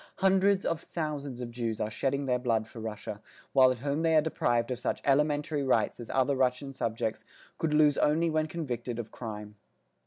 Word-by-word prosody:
Hundreds 195 Hz, +1 st, +3 dB
of 165 Hz, -1 st, -1 dB
thousands 145 Hz, -7 st, -4 dB
of 120 Hz, -1 st, -5 dB
Jews 115 Hz, -2 st, -3 dB
are 110 Hz, -, -2 dB
shedding 140 Hz, +5 st, -1 dB
their 125 Hz, -1 st, +1 dB
blood 115 Hz, -3 st, 0 dB
for 115 Hz, -, -11 dB
Russia, 105 Hz, -1 st, -6 dB, 0.3 s
while 130 Hz, -1 st, +7 dB
at 130 Hz, -, -1 dB
home 145 Hz, +2 st, -1 dB
they 165 Hz, -1 st, +3 dB
are 155 Hz, -, +7 dB
deprived 120 Hz, -6 st, 0 dB
of 125 Hz, -, -2 dB
such -, -, -1 dB
elementary 150 Hz, +2 st, +2 dB
rights 130 Hz, -2 st, +1 dB
as 120 Hz, -, -8 dB
other 135 Hz, +1 st, +2 dB
Russian 130 Hz, +1 st, 0 dB
subjects 115 Hz, -3 st, -2 dB, 0.4 s
could 160 Hz, -, 0 dB
lose 150 Hz, -2 st, +5 dB
only 160 Hz, +3 st, +3 dB
when 155 Hz, -1 st, +1 dB
convicted 125 Hz, -8 st, -4 dB
of 115 Hz, -2 st, -5 dB
crime. 105 Hz, -3 st, -7 dB
135 Hz, 190 wpm, -29 LUFS, 120-155 Hz, 0.4 s, while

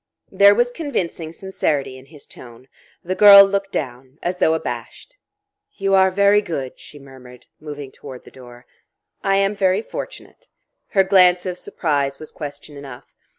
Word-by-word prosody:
There 200 Hz, 0 st, +5 dB
was 240 Hz, +2 st, +1 dB
convincing 190 Hz, -, -4 dB
sincerity 155 Hz, -7 st, -3 dB
in 130 Hz, +1 st, -15 dB
his 150 Hz, -1 st, -15 dB
tone. 120 Hz, +1 st, -15 dB, 0.4 s
The 185 Hz, -, -3 dB
girl 200 Hz, 0 st, +9 dB
looked 195 Hz, 0 st, -3 dB
down, 130 Hz, -1 st, -6 dB
as 180 Hz, +1 st, -3 dB
though 160 Hz, -, +2 dB
abashed. -, -, -7 dB, 0.6 s
"You 195 Hz, -1 st, -2 dB
are 190 Hz, 0 st, +5 dB
very 200 Hz, +2 st, +3 dB
good," 140 Hz, -9 st, -6 dB
she 150 Hz, -, -13 dB
murmured, 130 Hz, -3 st, -15 dB
moving 145 Hz, -3 st, -9 dB
toward 130 Hz, -3 st, -12 dB
the -, -, -16 dB
door. 120 Hz, -1 st, -15 dB, 0.6 s
"I 195 Hz, 0 st, +1 dB
am 195 Hz, +1 st, +1 dB
very 195 Hz, +1 st, +1 dB
fortunate." -, -, -10 dB, 0.4 s
Her 195 Hz, -, +2 dB
glance 180 Hz, -2 st, +3 dB
of 180 Hz, -1 st, -5 dB
surprise 140 Hz, -4 st, -2 dB
was 155 Hz, -, -11 dB
question 145 Hz, 0 st, -9 dB
enough. 135 Hz, -3 st, -12 dB
165 Hz, 155 wpm, -20 LUFS, 135-195 Hz, 0.6 s, girl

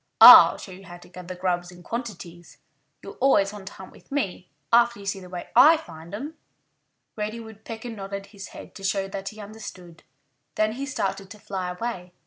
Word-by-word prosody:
I'll -, -, +11 dB
show 190 Hz, -, -10 dB
you 190 Hz, +1 st, -12 dB
how 175 Hz, 0 st, -10 dB
to 175 Hz, -, -17 dB
gather 180 Hz, 0 st, -9 dB
grubs 175 Hz, -1 st, -2 dB
in 175 Hz, 0 st, -15 dB
quantities. 175 Hz, -7 st, -7 dB, 0.5 s
You'll 195 Hz, -, -11 dB
always 210 Hz, -7 st, +3 dB
want 200 Hz, -2 st, -10 dB
to -, -, -8 dB
hunt 190 Hz, -, -12 dB
with -, -, -20 dB
me, 195 Hz, -10 st, -3 dB, 0.2 s
after 235 Hz, -2 st, +4 dB
you 200 Hz, -, -11 dB
see 195 Hz, 0 st, -2 dB
the 180 Hz, -1 st, -12 dB
way 180 Hz, -1 st, -7 dB
I 320 Hz, +3 st, +8 dB
find 165 Hz, -, -12 dB
'em." 295 Hz, +8 st, -7 dB, 0.8 s
Reddy 215 Hz, +2 st, -4 dB
Woodpecker 225 Hz, +1 st, -9 dB
nodded 200 Hz, -2 st, -6 dB
his 200 Hz, -2 st, -11 dB
head -, -, -12 dB
to 195 Hz, -, -12 dB
show 195 Hz, 0 st, 0 dB
that 195 Hz, 0 st, -5 dB
he 215 Hz, -, -13 dB
understood. 200 Hz, -5 st, -10 dB, 0.5 s
Then 215 Hz, 0 st, +1 dB
he 270 Hz, +5 st, -5 dB
started 195 Hz, -6 st, -3 dB
to 210 Hz, -, -11 dB
fly 190 Hz, -3 st, -4 dB
away. 180 Hz, -2 st, -5 dB
195 Hz, 195 wpm, -25 LUFS, 180-220 Hz, 0.8 s, I'll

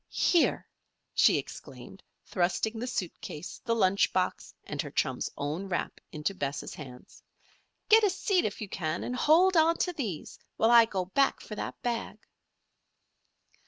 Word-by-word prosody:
"Here!" 345 Hz, -, +2 dB, 0.5 s
she -, -, +5 dB
exclaimed, -, -, -9 dB, 0.2 s
thrusting 195 Hz, +5 st, -1 dB
the 245 Hz, -, -3 dB
suit 190 Hz, -8 st, -3 dB
case, 150 Hz, +4 st, -8 dB
the 230 Hz, -, +1 dB
lunch 195 Hz, -3 st, +3 dB
box, 185 Hz, -1 st, -1 dB
and -, -, -4 dB
her -, -, -7 dB
chum's -, -, -1 dB
own 155 Hz, +7 st, -3 dB
wrap 175 Hz, -, -3 dB
into 155 Hz, +5 st, -2 dB
Bess' 140 Hz, -6 st, -4 dB
hands. 125 Hz, -4 st, -12 dB, 0.7 s
"Get 440 Hz, +1 st, +6 dB
a 410 Hz, -, +5 dB
seat 375 Hz, -1 st, +1 dB
if 210 Hz, -, -3 dB
you 210 Hz, -, -4 dB
can 160 Hz, -4 st, -3 dB
and 250 Hz, -, -3 dB
hold 345 Hz, +8 st, +4 dB
on 330 Hz, +1 st, +4 dB
to 360 Hz, -, -1 dB
these 215 Hz, -, -5 dB, 0.2 s
while 225 Hz, +1 st, +3 dB
I 235 Hz, -1 st, +8 dB
go 190 Hz, -4 st, -3 dB
back 270 Hz, +9 st, +1 dB
for -, -, -9 dB
that 210 Hz, -, -5 dB
bag." 240 Hz, -2 st, -3 dB
215 Hz, 160 wpm, -29 LUFS, 175-275 Hz, 0.7 s, I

